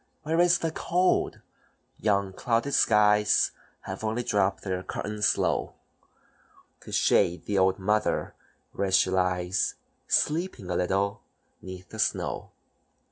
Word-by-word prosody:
"Where 160 Hz, +2 st, 0 dB
is 175 Hz, 0 st, +5 dB
the 165 Hz, -, -2 dB
cold? 180 Hz, +3 st, 0 dB, 0.6 s
Yon 100 Hz, -2 st, 0 dB
clouded 120 Hz, +7 st, -1 dB
skies 105 Hz, -2 st, +4 dB, 0.3 s
Have -, -, -7 dB
only 110 Hz, +3 st, -1 dB
dropped 100 Hz, -4 st, 0 dB
their 95 Hz, -2 st, -2 dB
curtains 105 Hz, +2 st, -1 dB
low -, -, -1 dB, 1.0 s
To -, -, -12 dB
shade 90 Hz, +1 st, +2 dB
the 100 Hz, -2 st, 0 dB
old 95 Hz, 0 st, +3 dB
mother 105 Hz, +2 st, 0 dB, 0.4 s
when 100 Hz, -, -2 dB
she 95 Hz, 0 st, +3 dB
lies, 90 Hz, 0 st, 0 dB, 0.3 s
Sleeping 150 Hz, -, 0 dB
a -, -, -1 dB
little, 100 Hz, +4 st, 0 dB, 0.4 s
'neath 95 Hz, 0 st, -10 dB
the 110 Hz, -, -10 dB
snow. 105 Hz, -, -1 dB
105 Hz, 125 wpm, -27 LUFS, 95-115 Hz, 1.0 s, is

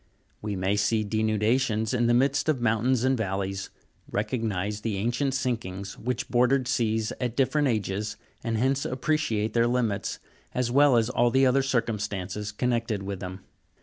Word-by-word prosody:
We 105 Hz, -1 st, -3 dB
may 95 Hz, +2 st, 0 dB
see 110 Hz, +2 st, +2 dB
denudations 110 Hz, +1 st, +1 dB
in 120 Hz, -1 st, +2 dB
the 120 Hz, -, +4 dB
rnidst 140 Hz, +4 st, +2 dB
of 150 Hz, -5 st, +2 dB
mountains 120 Hz, +2 st, +2 dB
and 130 Hz, 0 st, +3 dB
valleys, 95 Hz, -3 st, -3 dB, 0.4 s
recognise 105 Hz, -2 st, -2 dB
the 110 Hz, -3 st, -2 dB
ancient 120 Hz, +6 st, 0 dB
sinkings 100 Hz, -7 st, -3 dB
which 125 Hz, +1 st, -2 dB
bordered 125 Hz, +1 st, +2 dB
seas 110 Hz, -4 st, 0 dB
at 120 Hz, -2 st, -1 dB
different 145 Hz, +2 st, +2 dB
ages, 105 Hz, -3 st, -2 dB, 0.3 s
and 115 Hz, -1 st, -1 dB
hence 135 Hz, +4 st, +1 dB
appreciate 130 Hz, -6 st, 0 dB
their 115 Hz, 0 st, +3 dB
limits, 115 Hz, -5 st, -1 dB, 0.4 s
as 125 Hz, -1 st, 0 dB
well 140 Hz, -1 st, +5 dB
as 115 Hz, +1 st, +1 dB
all 120 Hz, -1 st, +2 dB, 0.2 s
other 130 Hz, +2 st, +3 dB
circumstances 105 Hz, -5 st, -2 dB
connected 115 Hz, -2 st, -1 dB
with 100 Hz, -1 st, -4 dB
them. 95 Hz, 0 st, -7 dB
115 Hz, 150 wpm, -27 LUFS, 105-125 Hz, 0.4 s, well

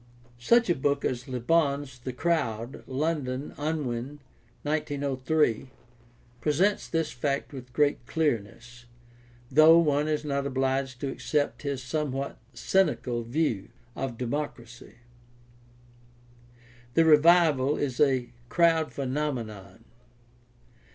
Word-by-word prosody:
Such 235 Hz, -, +4 dB
a 175 Hz, -, +3 dB
book 140 Hz, -1 st, 0 dB
as 125 Hz, -1 st, -2 dB
Le 130 Hz, -1 st, -3 dB
Bon's 140 Hz, -1 st, 0 dB
The 130 Hz, +2 st, -5 dB
Crowd 125 Hz, -5 st, -2 dB
(London: 140 Hz, -1 st, -2 dB
Unwin, 145 Hz, -3 st, -3 dB, 0.4 s
1903) 145 Hz, -3 st, 0 dB, 0.7 s
presents 180 Hz, +7 st, +1 dB
this 165 Hz, -2 st, -1 dB
fact 140 Hz, +3 st, -2 dB
with 125 Hz, -2 st, -9 dB
great 145 Hz, -2 st, +1 dB
clearness, 120 Hz, -5 st, -2 dB, 0.7 s
though 155 Hz, +4 st, +7 dB
one 150 Hz, -2 st, +2 dB
is 155 Hz, -1 st, -1 dB
not 140 Hz, -1 st, -1 dB
obliged 135 Hz, -1 st, -1 dB
to 140 Hz, -, -2 dB
accept 145 Hz, +1 st, -1 dB
his 140 Hz, -3 st, -3 dB
somewhat 140 Hz, -1 st, -3 dB, 0.2 s
cynical 125 Hz, -5 st, +1 dB
view 120 Hz, -4 st, -1 dB, 0.3 s
of 130 Hz, -4 st, -4 dB
democracy. 125 Hz, -2 st, -5 dB, 2.0 s
The 165 Hz, -, +5 dB
revival 155 Hz, -3 st, +5 dB
is 130 Hz, -4 st, -2 dB
a 130 Hz, -5 st, +2 dB, 0.2 s
crowd 165 Hz, -1 st, +3 dB
phenomenon. 120 Hz, -8 st, -4 dB
140 Hz, 105 wpm, -27 LUFS, 125-155 Hz, 2.0 s, though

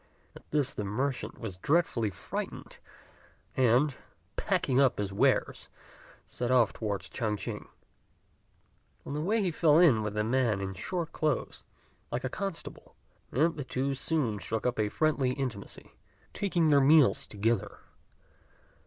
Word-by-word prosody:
At -, -, -15 dB
this 145 Hz, -3 st, 0 dB
the 105 Hz, -, -4 dB
merchant 125 Hz, +7 st, -2 dB
was 100 Hz, -6 st, -6 dB
dreadfully 140 Hz, -, +1 dB
frightened, 95 Hz, -, -6 dB, 0.8 s
and, 130 Hz, +3 st, +3 dB, 0.4 s
packing 130 Hz, 0 st, +1 dB
up 130 Hz, -3 st, +3 dB
his 100 Hz, -1 st, -3 dB
wares, 100 Hz, -, +1 dB, 0.6 s
set 120 Hz, -, -4 dB
off 125 Hz, -4 st, +4 dB
towards 105 Hz, -3 st, -3 dB
Ch'ang 110 Hz, -4 st, -2 dB
ch'ing. -, -, -6 dB, 1.4 s
On -, -, -5 dB
the 150 Hz, -, -2 dB
way 210 Hz, +6 st, +1 dB
he 180 Hz, -, +1 dB
fell 155 Hz, -1 st, +4 dB
in 155 Hz, -11 st, +6 dB
with 105 Hz, 0 st, -4 dB
a 105 Hz, -, +2 dB
man 115 Hz, -3 st, +1 dB
in 95 Hz, 0 st, -4 dB
short 170 Hz, -, -4 dB
clothes, 155 Hz, -3 st, -2 dB, 0.5 s
like 120 Hz, +1 st, -2 dB
a 130 Hz, -, -1 dB
constable; 195 Hz, +2 st, -6 dB, 0.4 s
and 160 Hz, +6 st, +2 dB
the 145 Hz, -, -3 dB
two 135 Hz, +2 st, -2 dB
soon 135 Hz, -6 st, -1 dB
struck 110 Hz, +2 st, -2 dB
up 125 Hz, -2 st, 0 dB
a 105 Hz, -1 st, +1 dB
friendly 140 Hz, -2 st, +1 dB
intimacy, 130 Hz, -7 st, -6 dB, 0.4 s
taking 175 Hz, -6 st, +1 dB
their 140 Hz, -1 st, +6 dB
meals 145 Hz, 0 st, +5 dB
together. 110 Hz, +1 st, -1 dB
130 Hz, 145 wpm, -29 LUFS, 110-150 Hz, 1.4 s, in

